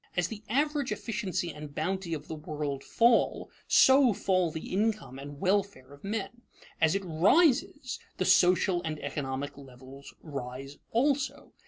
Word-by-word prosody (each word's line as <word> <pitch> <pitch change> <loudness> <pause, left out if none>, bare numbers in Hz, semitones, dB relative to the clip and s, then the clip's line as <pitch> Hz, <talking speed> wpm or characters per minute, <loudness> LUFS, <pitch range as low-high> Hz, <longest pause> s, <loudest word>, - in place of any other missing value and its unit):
As 180 -1 +1
the 215 -2 -7
average 285 +2 0
efficiency 200 -6 -3
and 150 -1 -10
bounty 180 +1 -2
of 150 -1 -9
the - - -5
world 150 -3 -4
fall, 235 0 +2 0.2
so 265 -3 +6
fall 185 -2 +1
the 160 +2 -7
income 210 - -1
and 140 +1 -9
welfare 190 -8 -1
of 140 - -16
men. 225 +3 -4 0.4
As 160 +2 +4
it 195 -1 -2
rises, 265 - +2 0.2
the 185 - 0
social 180 0 +4
and 155 -2 -4
economic 135 -1 -4
levels 135 +1 -13
rise 135 -1 -7
also. 275 +3 0
180 Hz, 145 wpm, -29 LUFS, 145-225 Hz, 0.4 s, so